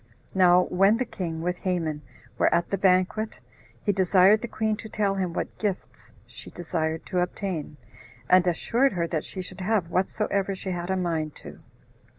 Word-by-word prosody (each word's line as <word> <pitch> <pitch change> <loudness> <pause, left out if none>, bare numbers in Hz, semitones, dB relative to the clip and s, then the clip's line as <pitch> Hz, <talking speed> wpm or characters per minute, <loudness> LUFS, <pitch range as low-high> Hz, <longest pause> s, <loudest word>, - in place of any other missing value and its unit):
Now 180 -1 +5
when 195 +5 +3
the 255 - -1
king, 165 -7 -5
with 180 +1 -1
Haman, 165 -5 -2 0.4
were - - +4
at 170 0 +1
the 195 - +1
banquet, 190 +3 +1 0.4
he 205 - +2
desired 190 +2 +4
the 235 - -4
queen 220 -1 -1
to 220 - -9
tell 205 -2 0
him 190 -3 -1
what - - -5
gifts 200 -3 -4
she - - -12
desired 160 -2 -3
to 180 - -1
obtain, 180 -4 -3 0.5
and 185 0 +5
assured 235 +10 +2
her 170 -2 0
that 165 -2 -2
she 185 - -6
should 185 +1 -10
have 185 -3 0
whatsoever 195 +1 0
she 190 0 -5
had 175 0 -4
a 190 - +1
mind 165 -4 -2
to. - - -10
185 Hz, 175 wpm, -26 LUFS, 175-200 Hz, 0.5 s, Now